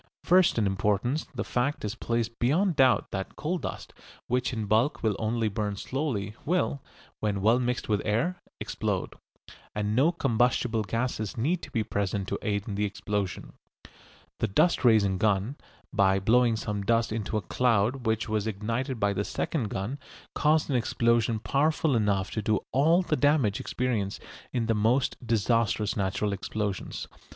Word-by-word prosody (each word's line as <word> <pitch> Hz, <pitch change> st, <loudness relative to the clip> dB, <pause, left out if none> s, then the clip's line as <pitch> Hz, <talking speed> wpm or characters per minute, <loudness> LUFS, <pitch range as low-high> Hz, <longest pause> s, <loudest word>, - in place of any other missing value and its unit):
First 180 Hz, -4 st, +4 dB
in 110 Hz, -, +2 dB
importance 105 Hz, +8 st, 0 dB
the -, -, -2 dB
fact 130 Hz, +1 st, -1 dB
is 105 Hz, -, -2 dB
placed 115 Hz, -1 st, -2 dB
beyond 165 Hz, +9 st, +2 dB
doubt 130 Hz, -2 st, +3 dB
that 95 Hz, -1 st, -4 dB
coal 175 Hz, +4 st, -2 dB
dust, -, -, -6 dB, 0.3 s
which 125 Hz, +1 st, 0 dB
in 110 Hz, -4 st, -3 dB
bulk 110 Hz, +8 st, +1 dB
will 110 Hz, -3 st, +2 dB
only 110 Hz, 0 st, 0 dB
burn 105 Hz, 0 st, -2 dB
slowly, 110 Hz, -4 st, -3 dB
will, 160 Hz, -4 st, 0 dB, 0.4 s
when 105 Hz, -2 st, -1 dB
well 110 Hz, +5 st, +4 dB
mixed 125 Hz, 0 st, -1 dB
with 105 Hz, -2 st, +1 dB
air, 150 Hz, +13 st, 0 dB, 0.2 s
explode. -, -, -2 dB, 0.6 s
And 105 Hz, 0 st, -1 dB
no 140 Hz, +7 st, +4 dB
combustible 125 Hz, -6 st, +1 dB
gas 115 Hz, -1 st, -2 dB
need 160 Hz, +10 st, -1 dB
be 115 Hz, -, 0 dB
present 100 Hz, -2 st, -2 dB
to -, -, -2 dB
aid 100 Hz, -2 st, -2 dB
in 105 Hz, -, -3 dB
the 100 Hz, +1 st, -1 dB
explosion. 100 Hz, -1 st, -3 dB, 0.9 s
The 115 Hz, -, +1 dB
dust 155 Hz, -, +2 dB
raising 105 Hz, -6 st, +4 dB
gun, 105 Hz, +4 st, +1 dB, 0.4 s
by 95 Hz, -3 st, +4 dB
blowing 115 Hz, +3 st, +3 dB
some 105 Hz, -2 st, -3 dB
dust 115 Hz, +2 st, +1 dB
into 110 Hz, 0 st, -2 dB
a -, -, -1 dB
cloud 120 Hz, +3 st, +1 dB
which 110 Hz, 0 st, 0 dB
was 110 Hz, -1 st, -1 dB
ignited 115 Hz, +5 st, -2 dB
by 100 Hz, -1 st, +2 dB
the 100 Hz, -, -1 dB
second 120 Hz, +1 st, -2 dB
gun, 105 Hz, +10 st, -4 dB, 0.3 s
caused 155 Hz, +1 st, +2 dB
an -, -, +1 dB
explosion 115 Hz, -2 st, +2 dB
powerful 145 Hz, +4 st, +1 dB
enough 100 Hz, -4 st, +1 dB
to 110 Hz, -, -2 dB
do 105 Hz, 0 st, +1 dB
all 160 Hz, +8 st, +4 dB
the 155 Hz, -, 0 dB
damage 145 Hz, -9 st, +2 dB
experienced 115 Hz, -6 st, -2 dB, 0.3 s
in 120 Hz, -2 st, -1 dB
the 115 Hz, -, +2 dB
most 115 Hz, +5 st, +2 dB
disastrous 110 Hz, -1 st, +1 dB
natural 100 Hz, +1 st, -1 dB
explosions. 100 Hz, 0 st, -4 dB
115 Hz, 160 wpm, -28 LUFS, 105-125 Hz, 0.9 s, First